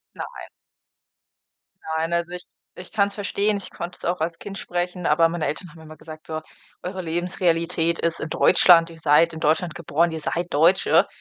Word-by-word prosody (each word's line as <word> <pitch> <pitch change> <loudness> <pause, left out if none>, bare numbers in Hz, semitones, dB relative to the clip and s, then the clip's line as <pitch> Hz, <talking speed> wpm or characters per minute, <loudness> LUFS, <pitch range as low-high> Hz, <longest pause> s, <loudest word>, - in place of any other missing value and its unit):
Nein. - - -8 1.5
Nein, 165 +1 -1
also 170 0 -1
ich 180 0 -7 0.3
ich 180 - -11
kann's 200 -1 +1
verstehen. 205 0 0
Ich 200 - -6
konnte 175 +1 -7
es - - -12
auch 175 0 -1
als 165 +1 -2
Kind 195 +2 -8
sprechen, 180 -1 -3
aber 165 +2 +4
meine 165 -2 -3
Eltern 175 +4 -4
haben 160 +1 -16
immer 155 0 -12
gesagt: 155 -1 -12
„So, 155 0 -4 0.4
eure 185 +1 -5
Lebensrealität 170 0 0
ist 170 0 -1
in - - -4
Deutschland. 170 +1 +5
Ihr 165 -1 -13
seid 160 +2 +4
in 160 - -8
Deutschland 160 +2 +1
geboren, 170 0 0
ihr 160 - -4
seid 170 +3 -2
Deutsche.” 165 +6 +4
170 Hz, 180 wpm, -23 LUFS, 160-180 Hz, 1.5 s, Deutschland